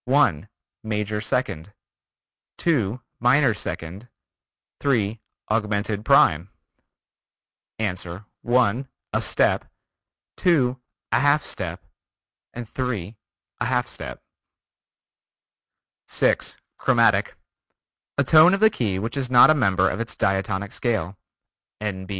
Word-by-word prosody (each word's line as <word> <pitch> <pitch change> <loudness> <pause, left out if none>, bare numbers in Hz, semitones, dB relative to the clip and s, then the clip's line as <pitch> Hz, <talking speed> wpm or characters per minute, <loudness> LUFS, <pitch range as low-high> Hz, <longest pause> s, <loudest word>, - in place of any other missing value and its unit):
(1) 125 - +2 0.3
Major 105 -1 -2
second, 100 -6 -3 0.8
(2) 125 - 0 0.2
minor 125 +1 +4
second, 95 +2 -6 0.7
(3) 115 -6 0 0.3
augmented 105 -1 -1
prime. 95 - +4 1.3
Answer: 95 -2 -4 0.2
(1) 125 +1 +1 0.3
a - - +1
step, - - +1 0.7
(2) 130 -8 +2 0.3
a - - +3
half 145 +2 +3
step, - - -6 0.7
(3) 120 -4 -4 0.4
a 120 - -1
half 125 0 0
step. 110 - -8 1.8
6. - - 0 0.2
Chromatic: - - +2 0.8
A 140 - +3
tone 160 +7 +6
of - - -4
the 220 +1 +5
key 105 - -2
which 110 +7 -4
is 135 -3 -2
not 125 +4 +7
a - - +6
member 95 -9 +2
of - - -2
its 115 -1 -4
diatonic 95 +1 -1
scale. 105 -6 -2 0.6
(N. 95 -3 -4
110 Hz, 105 wpm, -23 LUFS, 100-130 Hz, 1.8 s, not